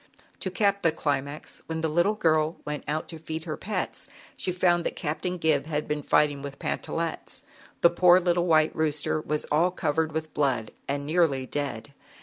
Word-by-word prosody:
To 190 Hz, -, -2 dB
cap 200 Hz, +1 st, +1 dB
the 165 Hz, -, +3 dB
climax, 145 Hz, -1 st, -3 dB
when 160 Hz, 0 st, -3 dB
the 160 Hz, -, +1 dB
little 175 Hz, +7 st, +2 dB
girl 160 Hz, -4 st, +2 dB
went 150 Hz, 0 st, -4 dB
out 155 Hz, +1 st, -2 dB
to 165 Hz, -, -6 dB
feed 160 Hz, 0 st, -5 dB
her 155 Hz, -2 st, -4 dB
pets, 210 Hz, +2 st, -4 dB, 0.3 s
she 185 Hz, -, -2 dB
found 175 Hz, -1 st, +2 dB
that -, -, -2 dB
Captain 180 Hz, +4 st, -3 dB
Gib 155 Hz, -4 st, +1 dB
had 150 Hz, -1 st, -2 dB
been 150 Hz, 0 st, -1 dB
fighting 145 Hz, 0 st, +2 dB
Pantallettes. 155 Hz, +3 st, -4 dB, 0.4 s
The 170 Hz, -, +6 dB
poor 180 Hz, +1 st, +6 dB
little 175 Hz, -1 st, +1 dB
white 155 Hz, -2 st, +4 dB
rooster 155 Hz, 0 st, 0 dB
was 150 Hz, 0 st, -2 dB
all 165 Hz, +4 st, +4 dB
covered 160 Hz, -3 st, 0 dB
with 155 Hz, 0 st, -4 dB
blood 130 Hz, -6 st, 0 dB, 0.2 s
ai 140 Hz, -, +1 dB
nearly 145 Hz, -2 st, +1 dB
dead. 140 Hz, -2 st, -4 dB
155 Hz, 175 wpm, -27 LUFS, 150-175 Hz, 0.4 s, The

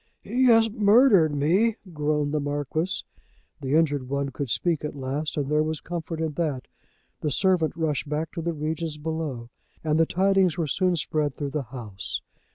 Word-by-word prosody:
"He 250 Hz, +5 st, +1 dB
has 225 Hz, -2 st, +6 dB
murdered 205 Hz, -, +5 dB
me," 185 Hz, +11 st, +3 dB, 0.2 s
groaned 150 Hz, -1 st, 0 dB
the 150 Hz, -, +1 dB
Marquis. 145 Hz, +5 st, -2 dB, 0.6 s
The 135 Hz, +2 st, 0 dB
injured 145 Hz, -5 st, +1 dB
one 140 Hz, 0 st, -1 dB
could 135 Hz, 0 st, -4 dB
speak 165 Hz, +7 st, 0 dB
at 150 Hz, -, -4 dB
least, 140 Hz, +3 st, -3 dB
and 145 Hz, -2 st, 0 dB
there 150 Hz, +1 st, +2 dB
was 155 Hz, -1 st, -1 dB
comfort 165 Hz, -1 st, -5 dB
in 160 Hz, -1 st, -1 dB
that. 145 Hz, -5 st, -2 dB, 0.5 s
The 150 Hz, -, -1 dB
servant 180 Hz, 0 st, +2 dB
rushed 155 Hz, -3 st, -1 dB
back 155 Hz, +2 st, -2 dB
to 170 Hz, -, -5 dB
the 170 Hz, +1 st, -1 dB
regions 155 Hz, +1 st, -3 dB
below, 150 Hz, -7 st, -4 dB, 0.3 s
and 155 Hz, 0 st, +1 dB
the 165 Hz, -, +4 dB
tidings 190 Hz, -2 st, +2 dB
were 165 Hz, -, 0 dB
soon 180 Hz, +5 st, +1 dB
spread 150 Hz, -3 st, -1 dB
through 145 Hz, -2 st, -4 dB
the 150 Hz, -, -1 dB
house. 110 Hz, -7 st, -5 dB
155 Hz, 175 wpm, -25 LUFS, 145-170 Hz, 0.6 s, has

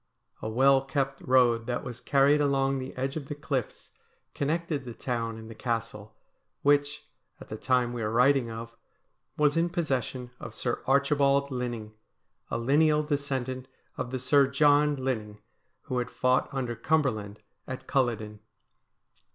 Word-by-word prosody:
A 110 Hz, -, -3 dB
well 135 Hz, +4 st, +4 dB
kept 135 Hz, -1 st, -2 dB
road 120 Hz, -3 st, +3 dB
that 125 Hz, 0 st, -2 dB
was 125 Hz, -1 st, -7 dB
carried 140 Hz, +1 st, +4 dB
along 135 Hz, -1 st, +1 dB
the 130 Hz, 0 st, -5 dB
edge 135 Hz, +2 st, -2 dB
of 150 Hz, -4 st, -5 dB
the 145 Hz, -, -5 dB
cliffs 140 Hz, -5 st, -4 dB, 0.4 s
connected 155 Hz, 0 st, -1 dB
the 120 Hz, -3 st, -8 dB
town 115 Hz, -3 st, -3 dB
and 110 Hz, 0 st, -10 dB
the 115 Hz, -, -9 dB
Castle, 115 Hz, -2 st, -4 dB, 0.5 s
which, 145 Hz, 0 st, +2 dB, 0.3 s
at -, -, -12 dB
the -, -, -4 dB
time 125 Hz, +1 st, +1 dB
we 120 Hz, -, -4 dB
are 105 Hz, -, -1 dB
writing 125 Hz, +2 st, +3 dB
of, 115 Hz, +1 st, -7 dB, 0.6 s
was 150 Hz, 0 st, +3 dB
in 170 Hz, +1 st, +2 dB
possession 130 Hz, -, -2 dB
of -, -, -8 dB
Sir 120 Hz, -, -2 dB
Archibald 140 Hz, 0 st, +3 dB
Linning, 120 Hz, -4 st, -4 dB, 0.6 s
a -, -, -1 dB
lineal 150 Hz, +5 st, +3 dB
descendant 135 Hz, -3 st, -2 dB, 0.3 s
of 125 Hz, -, -4 dB
the 130 Hz, -, -3 dB
Sir 140 Hz, +2 st, +4 dB
John 145 Hz, +1 st, +4 dB
Linning 115 Hz, -6 st, -3 dB, 0.5 s
who 125 Hz, -, -2 dB
had 125 Hz, 0 st, -3 dB
fought 125 Hz, 0 st, +1 dB
under 125 Hz, -4 st, -3 dB
Cumberland 115 Hz, -7 st, 0 dB, 0.3 s
at 130 Hz, -, -6 dB
Culloden. 110 Hz, -5 st, -1 dB
130 Hz, 150 wpm, -28 LUFS, 120-140 Hz, 0.6 s, well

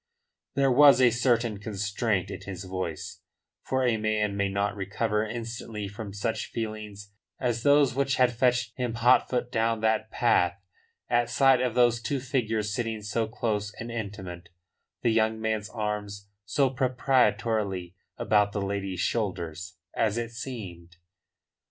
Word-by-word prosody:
There 135 Hz, -1 st, +3 dB
was 140 Hz, +1 st, +7 dB
a 125 Hz, -2 st, +6 dB
certain 120 Hz, -3 st, +1 dB
constraint 105 Hz, -1 st, -1 dB
in -, -, -7 dB
his 95 Hz, -1 st, -7 dB
voice, 95 Hz, -4 st, -5 dB, 0.4 s
for 130 Hz, -1 st, 0 dB
a 120 Hz, -3 st, +2 dB
man 105 Hz, -1 st, 0 dB
may 100 Hz, 0 st, 0 dB
not 100 Hz, +2 st, -1 dB
recover 105 Hz, +2 st, -1 dB
instantly 115 Hz, -2 st, -5 dB
from 105 Hz, +1 st, -7 dB
such 110 Hz, +2 st, -2 dB
feelings 105 Hz, -3 st, -6 dB, 0.3 s
as 120 Hz, -3 st, -1 dB
those 145 Hz, -1 st, +4 dB
which 135 Hz, +1 st, +1 dB
had 125 Hz, -1 st, +3 dB
fetched 120 Hz, -1 st, +1 dB
him 125 Hz, -3 st, -2 dB
hot 120 Hz, +2 st, +4 dB
foot 125 Hz, -1 st, -1 dB
down 115 Hz, 0 st, +1 dB
that 110 Hz, 0 st, +1 dB
path 100 Hz, -7 st, +2 dB, 0.5 s
at 120 Hz, 0 st, +2 dB
sight 135 Hz, +1 st, +4 dB
of 125 Hz, -3 st, -1 dB
those 120 Hz, -1 st, +4 dB
two 135 Hz, +5 st, -1 dB
figures 110 Hz, -5 st, -1 dB
sitting 110 Hz, -1 st, -3 dB
so 110 Hz, +2 st, -1 dB
close 105 Hz, -2 st, -2 dB
and 115 Hz, +1 st, -6 dB
intimate, 95 Hz, -6 st, -6 dB, 0.5 s
the 115 Hz, -, +3 dB
young 110 Hz, 0 st, +2 dB
man's 110 Hz, -1 st, -2 dB
arm 105 Hz, -2 st, -3 dB, 0.4 s
so 135 Hz, +5 st, +2 dB
proprietorialy 115 Hz, -8 st, +1 dB, 0.2 s
about 105 Hz, -1 st, +2 dB
the 100 Hz, -, -2 dB
lady's 100 Hz, -2 st, -3 dB
shoulders 85 Hz, -6 st, -3 dB, 0.2 s
as 110 Hz, 0 st, +1 dB
it 115 Hz, -1 st, -3 dB
seemed. 95 Hz, -8 st, -8 dB
110 Hz, 145 wpm, -27 LUFS, 100-120 Hz, 0.5 s, was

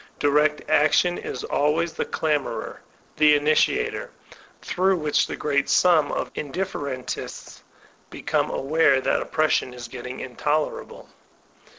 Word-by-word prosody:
Direct 150 Hz, +1 st, +1 dB
action 165 Hz, +4 st, +3 dB
is 125 Hz, -, -6 dB
always 160 Hz, +3 st, 0 dB
the -, -, -3 dB
clamorer, 150 Hz, -3 st, -2 dB, 0.4 s
the 150 Hz, -1 st, +6 dB
initiator, 150 Hz, +1 st, +1 dB, 0.5 s
through 190 Hz, +1 st, +1 dB
which 150 Hz, -3 st, +1 dB
the -, -, -4 dB
great 140 Hz, -2 st, 0 dB
sum 165 Hz, -5 st, +4 dB
of -, -, -3 dB
indiffer 145 Hz, -1 st, -4 dB
entists 130 Hz, -1 st, -7 dB, 0.5 s
become -, -, -1 dB
aware 140 Hz, -1 st, +2 dB
that -, -, 0 dB
oppression 155 Hz, -5 st, 0 dB
is 120 Hz, -1 st, -8 dB
getting 125 Hz, +1 st, -8 dB
intoler 150 Hz, +4 st, -2 dB
able. -, -, -14 dB
150 Hz, 120 wpm, -24 LUFS, 140-155 Hz, 0.5 s, the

